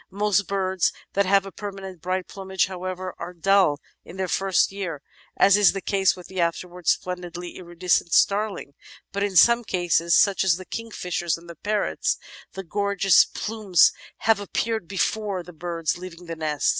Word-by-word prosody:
Most 205 -1 +1
birds 190 -2 0 0.2
that 200 -1 +2
have 195 0 +4
a 195 - -8
permanent 195 -4 -8
bright 185 +1 -2
plumage, 190 -1 -1
however, 185 0 -5
are 175 +1 -7
dull 185 -4 +3 0.2
in 180 - -12
their 190 -1 -1
first 195 +1 +2
year, 180 -7 -5 0.3
as 195 0 +6
is 205 -2 +5
the 195 - -3
case 195 -1 +2
with 180 - -12
the 190 -1 -3
afterwards 175 +1 -2
splendidly 180 -1 -7
iridescent 175 -1 0
Starling, 200 -8 +1 0.4
but 200 - -3
in 200 -2 -1
some 235 +6 +6
cases, 175 -4 +1
such 200 -2 +4
as 180 -3 +3
the 185 - -9
Kingfishers 180 -8 -3
and 170 +1 -16
the 170 - -8
Parrots, 210 +5 -1 0.4
the 195 - -6
gorgeous 200 0 +3
plumes 210 -5 +2 0.3
have 225 -2 +2
appeared 220 -1 -2
before 195 0 -1
the 180 - -12
birds 165 0 -3
leave 180 -2 -9
the 170 -1 -7
nest. 155 -2 0
185 Hz, 170 wpm, -24 LUFS, 175-200 Hz, 0.4 s, as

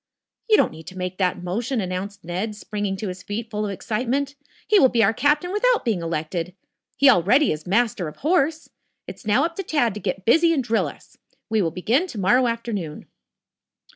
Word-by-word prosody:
"You 430 - +6
don't - - +3
need 160 0 -12
to 185 - -9
make 185 +1 -4
that 180 -1 0
motion," 230 +8 -2
announced 195 +1 -4
Ned, 185 +6 -3
springing 205 -2 -4
to 210 - -4
his 180 0 -7
feet, 220 +4 -5
full 210 0 -2
of 200 - -3
excitement. 255 +8 -2 0.3
"He 420 - +5
will 260 - +6
be 235 -2 +2
our 210 +2 +3
captain 295 - +1
without 485 - +2
being 215 -7 0
elected. 165 +2 -3 0.4
He 280 +2 +5
already 250 - +5
is 155 +3 -5
master 205 -3 +1
of 150 - -8
horse. 315 0 +1 0.4
It's 225 - -10
now 210 - +3
up 335 0 -4
to 390 - -2
Tad 290 - +1
to 210 - -6
get 190 -1 -4
busy 330 +8 +5
and 275 -5 0
drill 220 -8 +1
us. - - -13 0.3
We 220 -1 +3
will 170 - +1
begin 225 - 0
to 240 - -9
morrow 240 +6 +3
afternoon." 220 -9 -4
215 Hz, 200 wpm, -23 LUFS, 185-265 Hz, 0.4 s, You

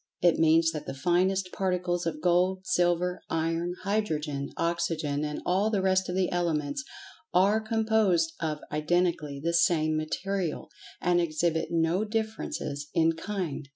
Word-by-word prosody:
It 175 -2 +3
means 160 0 +4
that 155 -2 -6
the - - -4
finest 180 +5 +1
particles 180 -2 -1
of 155 -2 -3
Gold, 185 +1 +2
Silver, 180 -3 +1
Iron, 165 +2 -1
Hydrogen, 155 -9 -1
Oxygen, 165 -3 -1
and 150 0 -4
all 195 +4 +2
the 200 -3 0
rest 190 -1 +2
of 180 - -2
the 185 -1 +1
Elements, 165 - -1 0.5
are 200 +4 +4
composed 220 -7 +2
of 155 -2 -2
identically 155 -2 0
the 165 +4 -1
same 155 -2 +3
material, 170 +2 -3 0.3
and 175 0 +3
exhibit 165 0 0
no 165 +4 +1
differences 215 -9 -3
in 165 0 +4
"kind." 165 -5 -4
175 Hz, 140 wpm, -28 LUFS, 160-185 Hz, 0.5 s, means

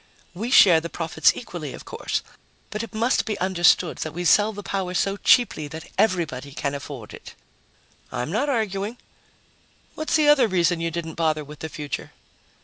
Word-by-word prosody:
"We 215 +7 -4
share 180 -10 +7
the 170 - -5
profits 165 0 +2
equally, 170 - -7
of - - -12
course. - - -3 0.5
But 210 - -3
it 230 - -7
must 235 +4 +2
be 215 -3 -3
understood 180 -2 +2
that 155 - -4
we 175 +1 -3
sell 205 +5 +5
the 205 -1 -8
power 190 -2 -3
so 195 +2 +1
cheaply 210 - +3
that 160 +2 -9
everybody 155 -9 0
can 140 0 -2
afford 140 -5 -8
it." - - -11 0.8
"I'm 125 +4 -3
not 255 +9 0
arguing. 215 -2 -2 1.0
What's 310 - -2
the 305 -2 +4
other 285 -5 +6
reason 175 -3 +1
you 165 - 0
didn't 165 -1 -5
bother 155 -1 +1
with 150 +1 -12
the 160 - -5
future?" 150 -1 -6
175 Hz, 175 wpm, -24 LUFS, 155-215 Hz, 1.0 s, share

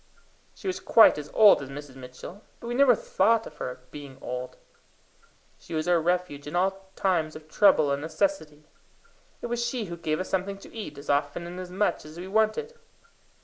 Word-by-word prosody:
She - - -16
was 370 -1 -2
quite 225 -8 +6
as 150 0 -8
old 210 -7 +7
as 135 - -7
Mrs. 140 -1 -9
Mitchell, 130 +9 -10 0.2
but - - -11
we 240 - -3
never 265 0 +5
thought 470 - +2
of 150 - -12
her 125 -2 -6
being 140 -3 -10
old. 125 0 -6 1.0
She 165 - -8
was 155 +2 -1
our 175 -2 +3
refuge 175 -4 -1
in 150 - -5
all 190 +1 -1
time 180 -5 +1
of 155 0 -12
trouble 155 -4 +4
and 140 0 -1
necessity. 160 - -2 0.8
It - - -2
was 240 0 -2
she 235 -1 -2
who 170 -2 -7
gave 155 -2 -2
us 185 - -3
something 195 +1 -2
to 195 - -14
eat 195 -10 -7
as 140 +1 -3
often 145 +4 -1
and 175 +1 -7
as 180 -1 -7
much 195 +3 0
as 155 +2 -12
we 180 +2 -7
wanted. 220 - 0
175 Hz, 195 wpm, -27 LUFS, 150-215 Hz, 1.0 s, old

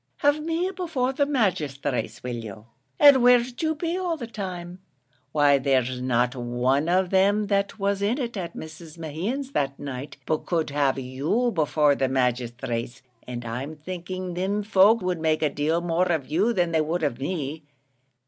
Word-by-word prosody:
Have 290 +1 +4
me 335 +4 -1
before 285 -8 -1
the 285 +1 +1
magisthrates 155 - -1
will 125 -1 -3
you? 105 0 -9 0.3
and 280 -3 +8
where'd 245 +1 +4
you 315 -1 +1
be 335 +3 -2
all 350 -3 -1
the 245 - -5
time? 185 -5 -6 0.5
Why 145 -2 +4
there's 130 -2 +1
not 125 +1 +1
one 125 +5 0
of 185 0 +2
them 200 +2 +3
that 200 0 0
was 200 -1 0
in 210 +5 +1
it, 240 -5 -3
at 180 -4 -5
Mrs. 160 +1 -10
Mehan's 190 - -4
that 140 - -1
night, 140 0 -7
but 155 -1 -2
could 165 -4 0
have 140 -2 +1
you 140 - 0
before 150 -4 +3
the 135 -1 0
magisthrates, 125 -1 -2 0.2
and 120 -1 -6
I'm 130 +7 -5
thinking 185 +3 -6
thim 195 +4 -1
folk 205 +1 +5
would 180 -2 -1
make 160 0 +1
a 150 - +2
deal 155 +4 0
more 175 +1 +1
of 155 -6 0
you 190 - +1
than 175 -6 +1
they 160 -1 +2
would 160 +2 -1
of 135 -5 -1
me. 150 0 -3
165 Hz, 175 wpm, -25 LUFS, 135-210 Hz, 0.5 s, and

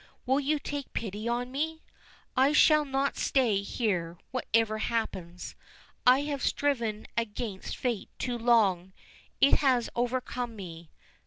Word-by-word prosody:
Will 265 +2 +3
you 295 +2 +1
take 285 -1 -5
pity 215 0 -4
on 245 +1 -1
me? 320 +4 -3 0.5
I 270 +3 +4
shall 305 0 +6
not 275 0 -1
stay 230 -7 +2
here, 185 -6 -2
whatever 225 -3 +1
happens; 185 -7 -3 0.5
I 255 +2 +7
have 285 -2 -3
striven 235 -8 0
against 215 -3 -3
fate 240 -5 -2
too 245 -2 -2
long 200 -6 +3 0.5
it 275 - +6
has 255 -5 +2
overcome 245 -1 -2
me. 170 -5 -9
240 Hz, 130 wpm, -29 LUFS, 210-270 Hz, 0.5 s, I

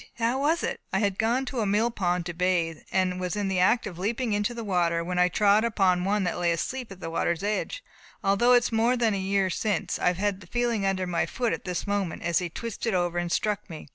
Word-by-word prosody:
how 235 +3 +1
was 310 +4 +1
it?" - - -2
"I - - +1
had 200 -1 0
gone 240 +4 +1
to 255 -1 -4
a 215 - 0
mill 215 +4 +2
pond 180 -5 -1
to 175 - -4
bathe, 170 -2 0
and 185 -1 +1
was 180 +2 -2
in 205 -2 -1
the 190 -1 0
act 195 +6 +3
of 180 -5 -7
leaping 225 +4 -1
into 205 +4 0
the 230 - -5
water, 170 -4 +1
when 180 +1 -2
I 180 - +5
trod 205 +3 +3
upon 190 -6 +2
one 205 +1 +1
that 180 - -2
lay 175 -1 +2
asleep 240 +8 -3
at 190 -1 -11
the 165 - -5
water's 170 +2 -1
edge. 215 - -2 0.4
Although 200 +6 +4
it 245 -1 +5
is - - -2
more 230 +3 +2
than 230 -3 +2
a 200 - -1
year 190 0 +1
since, 205 -2 -1
I 180 - +2
have 195 +1 -1
the 185 - -14
feeling 235 -2 0
under 185 -1 0
my 175 -2 0
foot 240 -2 -1
at - - -5
this 180 -2 -3
moment 200 -5 -2
as 170 -1 +2
he 180 -1 -3
twisted 230 +2 -3
over 175 -1 0
and 175 0 -3
struck 210 +1 -1
me. 155 -3 -9
195 Hz, 255 wpm, -27 LUFS, 180-225 Hz, 0.4 s, I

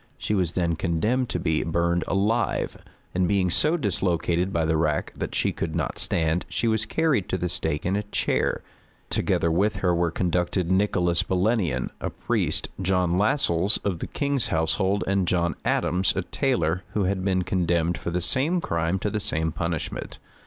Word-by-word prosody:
She - - -2
was 90 -4 +1
then 85 -2 0
condemned 105 +10 0
to 90 - -1
be 80 -1 +1
burned 85 +1 0
alive; 105 +5 0 0.3
and 90 0 +2
being 95 -2 +2
so 155 - +2
dislocated 90 - 0
by 85 -3 +1
the 80 0 +1
rack 75 -2 0
that - - -4
she - - +1
could 80 -1 -4
not 80 -6 -2
stand, 80 +1 +1
she 115 - -1
was 110 -1 +1
carried 150 - +1
to 95 - 0
the 90 0 -1
stake 75 -3 -2
in 95 +2 +1
a 105 - +1
chair. 105 0 -1 0.5
Together 85 - +1
with 100 +6 +2
her 95 -3 +1
were 85 0 +1
conducted 90 +1 0
Nicholas 90 -3 +2
Belenian, 95 - 0
a - - -2
priest, - - -1
John 90 -1 +1
Lassels, 100 - +2
of 95 -5 -1
the - - -4
king's 140 -3 -1
household, 95 +5 +1
and 100 -2 +1
John 85 -1 +1
Adams, 95 +2 +1
a - - -1
tailor, 90 - 0
who 105 - +1
had 95 0 0
been 95 -1 +1
condemned 85 -2 +1
for - - -4
the 90 +1 -1
same 145 - +1
crime 85 - -1
to 105 +2 -2
the 105 - -1
same 80 -5 -1
punishment. 85 -1 -4
90 Hz, 180 wpm, -25 LUFS, 85-100 Hz, 0.5 s, and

